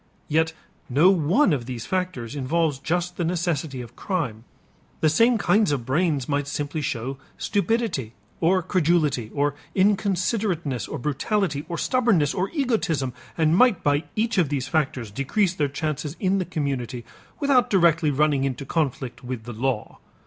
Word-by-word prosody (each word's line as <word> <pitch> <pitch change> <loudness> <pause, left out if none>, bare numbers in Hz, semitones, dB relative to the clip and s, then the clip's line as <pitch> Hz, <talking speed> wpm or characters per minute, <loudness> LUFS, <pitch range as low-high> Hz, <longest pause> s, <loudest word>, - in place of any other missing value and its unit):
Yet 160 +1 +1 0.4
no 150 +9 +5
one 185 - +3
of 125 -5 -2
those 120 -3 -5
factors 180 -10 -3
involves 145 +1 0
just 175 +4 -2
the 175 - 0
necessity 165 -6 -1
of 120 +1 -13
crime. 130 - -3 0.6
The 155 - +4
same 230 +9 +4
kinds 210 -3 +3
of 130 -5 -1
brains 145 -1 +1
might 145 -1 -1
simply 145 +1 -3
show 135 0 -3 0.2
stupidity 205 - -1 0.2
or 180 +2 +3
credulity 155 - +1
or 145 0 0 0.2
inconsiderateness 190 - +1
or - - -4
brutality 150 - -1
or 170 - -3
stubbornness 220 - +2
or 185 +2 -1
egotism, 215 - 0 0.2
and 160 0 +3
might 245 -1 +4
by 145 +2 +2
each 225 -1 +1
of 165 -6 +2
those 135 -3 -2
factors 135 -6 -1
decrease 170 - 0
their 145 -5 0
chances 150 +1 -3
in 195 +1 +1
the 185 - -1
community 135 -8 -3 0.3
without 265 -4 +3
directly 170 -5 +4
running 145 -1 +2
into 135 0 -2
conflict 135 -5 -2
with 125 -2 -5
the 120 +1 -7
law. 120 0 -2
155 Hz, 155 wpm, -24 LUFS, 135-185 Hz, 0.6 s, no